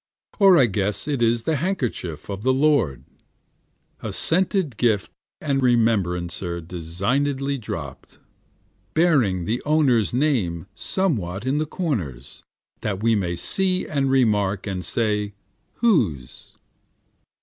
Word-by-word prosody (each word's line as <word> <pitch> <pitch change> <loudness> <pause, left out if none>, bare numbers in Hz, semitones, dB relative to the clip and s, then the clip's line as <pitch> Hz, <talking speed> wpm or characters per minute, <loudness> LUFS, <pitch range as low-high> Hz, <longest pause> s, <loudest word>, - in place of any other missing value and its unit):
Or 195 -3 +7
I 135 - +6
guess 100 0 -2
it 140 -5 -1
is 115 0 +2
the 160 +2 0
handkerchief 125 - -3
of 100 -1 -5
the 130 +4 +2
Lord, 135 - +2 1.0
A - - -4
scented 180 - 0
gift 110 -5 +1 0.3
and 140 -3 0
remembrancer 95 -8 +1
designedly 125 - -2
dropt, 80 - -7 0.8
Bearing 130 - +3
the 115 +6 -1
owner's 140 -8 +3
name 120 - 0
someway 105 - -2
in 135 +3 +1
the 155 - -1
corners, 95 - -4 0.4
that 100 0 -3
we 115 0 +4
may 90 -5 0
see 185 - -1
and 140 -3 0
remark, 105 -7 +2
and 95 -3 -3
say 105 -2 -1 0.4
Whose? 100 - 0
115 Hz, 115 wpm, -23 LUFS, 95-145 Hz, 1.0 s, Or